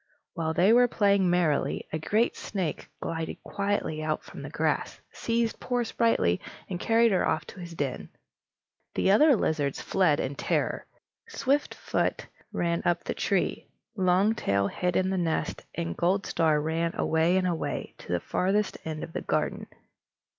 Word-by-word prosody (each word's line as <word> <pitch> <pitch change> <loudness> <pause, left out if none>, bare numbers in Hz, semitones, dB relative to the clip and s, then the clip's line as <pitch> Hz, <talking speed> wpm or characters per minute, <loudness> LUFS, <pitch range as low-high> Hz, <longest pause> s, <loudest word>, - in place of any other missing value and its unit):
While 160 -2 -2
they 190 +6 +5
were 245 +1 +6
playing 200 -4 +3
merrily, 175 -5 +1
a 155 - -1
great 215 +9 +1
snake 185 -7 -4
glided 165 -1 -4
quietly 200 -6 -2
out 155 0 -1
from - - -10
the - - -6
grass, - - -1
seized 230 -1 -1
poor 245 -1 0
Sprightly, 220 - +1 0.3
and 180 -2 -4
carried 230 +2 +4
her 190 - +2
off 155 -1 0
to - - -11
his 170 -1 -8
den. 140 -5 -3 0.9
The 195 - +3
other 290 +7 +6
lizards 150 -8 0
fled 180 -6 +2
in 135 - -2
terror. - - -1 0.4
Swiftfoot 290 - -1 0.3
ran 170 -1 0
up 175 - +1
the - - -2
tree, - - -1 0.3
Longtail 185 - +2
hid 180 -1 -1
in 185 0 +1
the 190 - 0
nest, 165 -2 -1
and 85 0 -3
Goldstar 170 -4 +2
ran 165 +2 -1
away 160 +3 +2
and 185 - +1
away, 170 -3 -2
to - - -9
the 90 - +1
farthest 195 - 0
end 155 -1 -4
of 165 - -8
the - - -3
garden. - - -1
180 Hz, 155 wpm, -28 LUFS, 160-205 Hz, 0.9 s, were